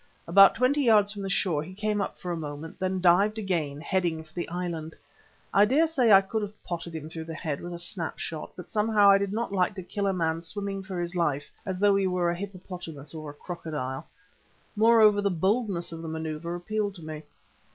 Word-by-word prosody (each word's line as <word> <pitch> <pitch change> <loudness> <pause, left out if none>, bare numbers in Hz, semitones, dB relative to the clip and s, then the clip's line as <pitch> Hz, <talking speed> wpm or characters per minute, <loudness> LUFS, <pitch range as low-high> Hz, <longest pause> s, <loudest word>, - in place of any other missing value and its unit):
About 195 +3 +7
twenty 255 +5 +2
yards 215 -5 +4
from 205 -1 -7
the 195 - -3
shore 180 -6 +1
he 185 +5 -9
came 210 0 0
up - - -4
for 180 - -5
a - - -1
moment, 150 0 -7
then 185 0 -1
dived 190 +5 +4
again 165 -9 -2
heading 170 -1 -1
for 155 0 -20
the 175 - -4
island. 170 -2 -4 0.6
I 200 - +6
dare 285 +9 +4
say 265 -8 +2
I 195 -1 +9
could 215 +3 -3
have 205 0 -7
potted 170 -1 -5
him 155 -1 -5
through 160 0 -6
the 165 0 -6
head 150 -2 -3
with 175 - -6
a 175 - -5
snap 170 0 -3
shot, 160 -2 -5
but 180 - -9
somehow 210 -2 +5
I 195 - +6
did 200 -1 -2
not 220 -1 -2
like 185 +1 +1
to 190 - -6
kill 200 +3 -2
a - - +3
man 165 -3 -1
swimming 195 +3 -4
for 190 -2 -5
his 175 +1 -3
life 145 -5 0 0.2
as 190 -1 -2
though 200 +1 +4
he 195 -1 +2
were 180 -2 +1
a - - -2
hippopotamus 180 -6 -7
or 155 -2 -7
a - - -8
crocodile. 150 -6 -5 0.7
Moreover, 215 -1 +6
the 200 - +2
boldness 190 0 0
of 165 0 -7
the 165 - -6
manoeuvre 160 +1 -4
appealed 205 +2 -2
to 170 - -11
me. 155 -1 -6
180 Hz, 225 wpm, -27 LUFS, 165-205 Hz, 0.7 s, I